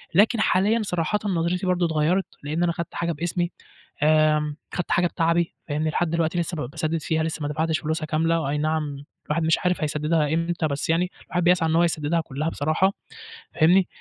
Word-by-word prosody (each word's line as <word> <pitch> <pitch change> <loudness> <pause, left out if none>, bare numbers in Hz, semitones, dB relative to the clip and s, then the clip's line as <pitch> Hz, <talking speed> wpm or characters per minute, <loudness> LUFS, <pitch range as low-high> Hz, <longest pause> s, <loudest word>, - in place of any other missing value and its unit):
لكن 220 +4 +4
حاليًا 210 +5 +2
صراحةً 180 +1 -1
نظرتي 180 -1 0
برضه 180 -1 +2
اتغيّرت، 165 +4 +1 0.2
لإن 155 +4 -1
أنا 175 - +2
خدت 170 0 -5
حاجة 170 0 -1
باسمي، 175 +2 -2 0.5
آمم 150 -1 +3 0.2
خدت 180 - -3
حاجة 175 0 +3
بِتَعَبِي 170 0 0
فاهمني، 155 +1 0
لحد 175 +1 0
دلوقتي 165 +1 0
لسه 170 0 -2
ب 130 -5 -4
باسدِّد 160 +1 -2
فيها، 160 +1 0
لسه 160 -1 -3
ما 145 - -1
دفعتش 160 +1 0
فلوسها 155 +3 -2
كاملة، 165 +2 +1
وآينعم 150 -1 -2 0.2
الواحد 155 +2 0
مش 160 0 +3
عارف 180 -1 0
هيسدّدها 150 0 +1
إمتى، 165 0 0
بس 140 +2 -2
يعني 180 +2 +1 0.2
الواحد 180 -1 -1
بيسعى 175 -2 +3
إن 160 - +2
هو 170 - +5
يسدّدها 165 0 0
كُلّها 155 0 -3
بصراحة 160 +6 +1 0.6
فاهمني، 175 +3 +4
165 Hz, 185 wpm, -24 LUFS, 155-175 Hz, 0.6 s, هو